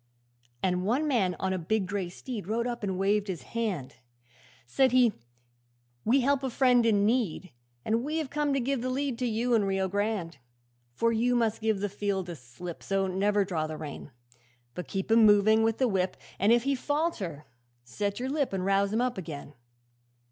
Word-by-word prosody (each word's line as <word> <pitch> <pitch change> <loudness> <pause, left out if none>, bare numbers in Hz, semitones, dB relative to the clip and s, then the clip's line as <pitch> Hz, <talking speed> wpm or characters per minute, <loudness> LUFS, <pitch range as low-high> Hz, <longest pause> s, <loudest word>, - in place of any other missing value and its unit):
'And 180 -1 +1
one 255 +10 +1
man 200 -10 +1
on 190 0 0
a 185 - -2
big 195 +4 0
grey 190 -1 -3
steed 215 0 -7
Rode 230 +3 0
up 240 -1 -3
and 190 -3 -2
waved 205 +2 +1
his 175 -8 -4
hand; 200 - -3 0.7
Said 260 - +2
he, 245 -4 +5 0.9
"We 260 +5 +3
help 275 +1 +2
a 265 - -2
friend 245 -1 +4
in 205 -2 +3
need, 215 -6 0 0.3
And 225 +2 +1
we 305 +3 -2
have 310 -4 -3
come 295 -1 0
to - - +2
give 260 0 -1
a 255 - -1
lead 265 -2 -2
To 250 - 0
you 235 +2 0
and 210 -4 +3
Rio 195 0 0
Grande. 200 -3 -2 0.6
'"For 230 - +2
you 240 +2 +2
must 225 -2 +1
give 215 -3 0
the 205 - 0
field 200 -1 -2
the 175 -1 -6
slip, 145 +7 -9
So 195 0 0
never 200 +2 +1
draw 160 -5 -2
the 155 0 -6
rein, 150 -1 -7 0.6
But 180 - -6
keep 195 +2 -3
him 225 0 +6
moving 215 +1 +6
with 225 0 +1
the 260 - +2
whip, 190 -4 0 0.2
And 205 +4 +4
if 235 0 +4
he 275 +1 +1
falter 255 - -2 0.4
set 200 - -3
your 255 +1 -2
lip 285 -5 -1
And 185 -1 -1
rouse 195 0 +2
him 225 +2 +1
up 250 -5 -1
again. 150 -4 -8
210 Hz, 200 wpm, -28 LUFS, 190-245 Hz, 0.9 s, him